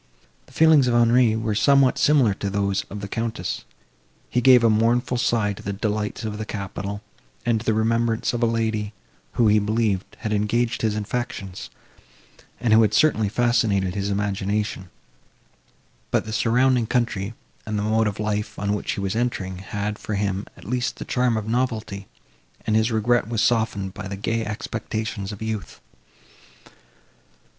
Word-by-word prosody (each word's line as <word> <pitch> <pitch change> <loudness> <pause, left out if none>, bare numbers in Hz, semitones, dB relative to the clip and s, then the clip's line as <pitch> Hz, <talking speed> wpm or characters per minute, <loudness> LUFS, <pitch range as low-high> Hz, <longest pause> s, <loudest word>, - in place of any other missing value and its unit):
The - - -19
feelings 155 -5 +5
of 120 - +2
Henri 120 -1 +4
were 110 -1 -1
somewhat 135 +4 +4
similar 135 -8 +4
to 100 0 -4
those 100 0 0
of 105 +1 -7
the 100 - -5
Countess; 115 +2 -3 0.7
he 125 - +2
gave 125 -1 +7
a - - +6
mournful 120 +3 +2
sigh 110 -4 +1
to - - -11
the 100 - -4
delights 105 +1 -2
of 105 -1 -4
the - - -2
capital, 100 0 -5 0.4
and 115 -2 +2
to 115 - -10
the 110 - +3
remembrance 115 +1 +1
of 120 - -2
a 120 - +4
lady, 110 -2 -1 0.4
who, 115 - +3
he 105 0 +5
believed, 105 -2 -1
had 110 -1 -2
engaged 115 +3 0
his 110 -2 +1
affections, 105 -3 -4 0.9
and 115 -3 +2
who 110 - +7
had 110 - +2
certainly 110 -9 +3
fascinated 110 -5 +1
his 100 0 -2
imagination; 100 -1 -2 1.2
but - - +1
the 110 - -5
surrounding 125 +1 +2
country, 115 -3 -1 0.3
and 105 -1 -2
the 105 - -1
mode 110 +1 +2
of 105 0 -4
life, 105 -1 -2
on 100 0 -1
which 105 - -2
he - - -5
was 100 +1 -2
entering, 95 -6 -2
had, 105 +2 -4
for 110 - -4
him, 100 0 -2
at 90 - -14
least, 125 +4 -1
the - - -7
charm 125 -2 +1
of 110 -1 -4
novelty, 110 -5 -2 0.6
and 110 - +1
his 110 +2 +2
regret 115 0 +2
was 115 -2 0
softened 110 -5 0
by 105 -1 -7
the 100 0 -5
gay 115 +3 -1
expectations 110 -1 -4
of 105 +1 -7
youth. 110 -2 -5
110 Hz, 170 wpm, -23 LUFS, 100-115 Hz, 1.2 s, gave